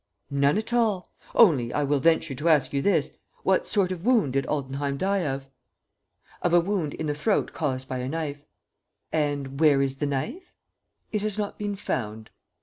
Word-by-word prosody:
"None 140 +4 +3
at 220 +2 -3
all; 220 -6 +1 0.2
only, 145 - +5
I 145 - 0
will 145 0 +1
venture 160 0 +2
to 150 +6 0
ask 150 -4 +3
you 140 - +1
this: 165 -4 +2 0.3
what 190 -1 +2
sort 195 -3 +2
of 180 -2 -5
wound 220 - +3
did 135 0 0
Altenheim 140 -1 -2
die 195 +6 +1
of?" 135 0 -3 1.0
"Of 175 -1 +2
a - - +7
wound 175 -4 -1
in 160 - -4
the 150 - 0
throat 195 +9 0
caused 130 -4 -2
by 130 - -3
a 125 +1 -3
knife." 145 -2 -4 0.7
"And 145 -3 -1
where 150 -3 +5
is 135 -1 0
the 145 - -1
knife?" 145 - -4 0.6
"It 210 - -1
has 210 -1 -2
not 205 -1 -3
been 205 -1 -2
found." 110 - -4
150 Hz, 185 wpm, -26 LUFS, 135-190 Hz, 1.0 s, a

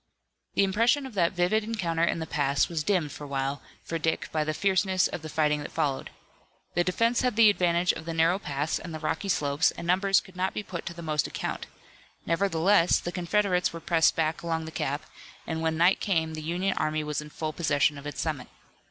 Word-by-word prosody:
The - - +4
impression 230 +9 +2
of 260 - -8
that 175 -4 +2
vivid 180 +5 +2
encounter 180 -7 -1
in 170 - +2
the 160 - -3
pass 140 -2 +1
was 165 -3 -2
dimmed 170 -5 +1
for 145 - -8
a - - -8
while 135 0 -2 0.2
for 165 - -3
Dick 160 0 -1
by 155 -1 +1
the 155 - -1
fierceness 190 +2 +2
of - - -6
the 155 - -7
fighting 150 -1 +1
that - - -7
followed. 140 -2 -1 0.6
The 175 - +2
defense 230 +7 +1
had 250 -3 0
the 220 -2 +7
advantage 175 -2 +2
of 160 - -8
the 165 - -3
narrow 165 +4 +3
pass 145 -2 -2
and 165 -3 -7
the - - -5
rocky 165 +5 -2
slopes, 145 -1 +2
and - - -7
numbers 190 +2 +3
could 185 - -15
not 185 +1 -1
be 210 - -3
put 170 -4 -6
to 170 - -5
the 170 - -8
most 155 -2 0
account. - - -4 0.6
Nevertheless, 170 +1 +3
the 175 - -4
Confederates 180 0 +1
were 165 - -6
pressed 165 -1 +3
back 160 0 0
along 165 -1 -2
the 160 - -7
gap, 145 0 -3 0.4
and 160 0 -3
when 160 -1 0
night 175 +3 +4
came 160 -5 0
the 155 - -5
Union 180 +5 -1
army 155 0 0
was 150 0 -2
in 150 - -10
full 155 +1 -4
possession 150 -2 +2
of 145 - -8
its 145 -3 -6
summit. 155 -5 -2
165 Hz, 220 wpm, -27 LUFS, 155-185 Hz, 0.6 s, the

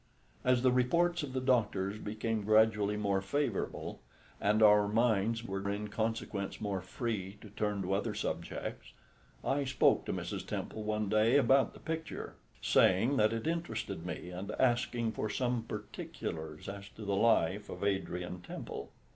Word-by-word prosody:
As 125 -1 +3
the 130 - +5
reports 170 +8 +2
of 140 -3 -5
the 130 - 0
doctors 110 -6 +1
became 110 +1 -2
gradually 105 -1 +4
more 100 -2 +1
favourable, 115 +1 -2 0.4
and 105 +2 +3
our 105 -1 +7
minds 115 0 +2
were 100 -2 -3
in 105 +1 -3
consequence 110 -2 -2
more 100 -3 -2
free 100 0 -4
to 105 - -11
turn 105 -2 -1
to 95 +1 -1
other 105 +2 -1
subjects, 80 - -4 0.5
I 140 +1 +1
spoke 130 -1 +3
to - - -2
Mrs. - - -4
Temple 110 - -4
one 105 0 -1
day 110 +6 +4
about 135 -1 +4
the - - -11
picture, 160 0 -5 0.3
saying 115 +10 +4
that 110 -1 +4
it 115 -1 -3
interested 110 - -2
me, 90 +1 -5
and 95 +3 -6
asking 120 -2 +2
for 110 - -3
some 120 -1 -1
particulars 85 -7 -6
as 100 0 -7
to 110 - -8
the 100 0 0
life 105 -2 +2
of - - -6
Adrian 90 -3 -2
Temple. - - -7
105 Hz, 155 wpm, -33 LUFS, 100-120 Hz, 0.5 s, our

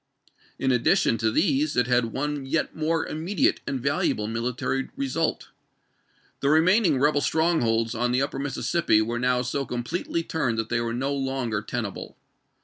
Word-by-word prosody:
In 130 - +1
addition 125 +2 +2
to 110 - +2
these 140 +6 +1
it 125 - +4
had 125 -1 +2
one 145 +5 -3
yet 155 +3 -1
more 160 +1 0
immedi 165 +4 -1
ate - - +2
and 135 - -2
valuable 140 -5 0
military 125 +4 -2
result. 135 -2 -2 0.9
The 140 - +1
remaining 165 +1 +4
rebel 145 +1 +3
strongholds 120 -8 +1
on 120 +2 0
the 125 +2 +2
upper 140 -1 -4
Mississippi 140 -2 +1
were 120 +2 -3
now 125 0 +1
so 135 +3 -2
completely 135 +7 -3
turned 130 -9 -1
that 115 0 -2
they 120 -1 0
were 115 0 -2
no 135 +3 -1
longer 135 -6 -2
tenable. 110 -3 -5
135 Hz, 160 wpm, -25 LUFS, 120-150 Hz, 0.9 s, it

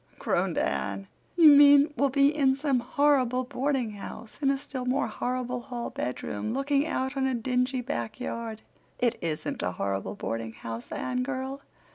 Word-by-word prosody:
groaned - - 0
Anne. 95 +9 -1 0.3
"You 325 -4 +9
mean 285 +1 +7
we'll 280 - +2
be 280 +2 +3
in 270 -3 +3
some 275 -2 +1
horrible 255 -1 +2
boardinghouse, 245 -5 -3
in 275 - +3
a 275 - +2
still 265 -1 -6
more 250 +2 +1
horrible 250 0 -3
hall 240 -2 -5
bedroom, 125 - -3
looking 280 +2 +1
out 265 -2 -2
on 265 -1 +1
a 260 - 0
dingy 250 +2 0
back 120 - -4
yard." 230 -3 -5 0.3
"It 240 -1 +1
isn't 160 -2 -3
a 90 +1 -1
horrible 95 +2 -3
boardinghouse, 115 +1 -5
Anne 250 0 -2
girl. 265 +1 -4
255 Hz, 155 wpm, -28 LUFS, 220-275 Hz, 0.3 s, You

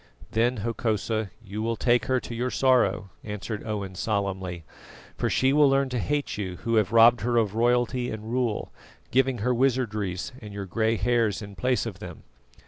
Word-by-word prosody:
"Then, 120 +3 +1
Hokosa, 110 -2 -1 0.2
you 100 +2 -5
will 115 +1 0
take 120 -1 +2
her 130 -1 +1
to - - -7
your 120 +2 -1
sorrow," 100 -8 +2
answered 105 +1 -5
Owen 100 -3 -4
solemnly, 95 -3 -2 0.5
"for - - -1
she 130 +1 +2
will 145 -1 +5
learn 135 0 +2
to 125 -1 -2
hate 145 -1 -2
you 95 -3 -3
who 115 -1 +1
have 105 -3 +2
robbed 115 +1 +6
her 120 +2 +1
of 110 -4 +2
royalty 120 +2 +1
and 110 -1 -6
rule, 120 -3 -1 0.4
giving 130 0 +2
her 125 - +3
wizardries 115 -7 0
and 105 -2 -9
your 100 -1 -4
grey 110 +4 0
hairs 115 -3 +1
in 100 0 -9
place 125 +8 0
of 100 -5 -6
them." 90 -5 -9
115 Hz, 180 wpm, -26 LUFS, 105-125 Hz, 0.5 s, robbed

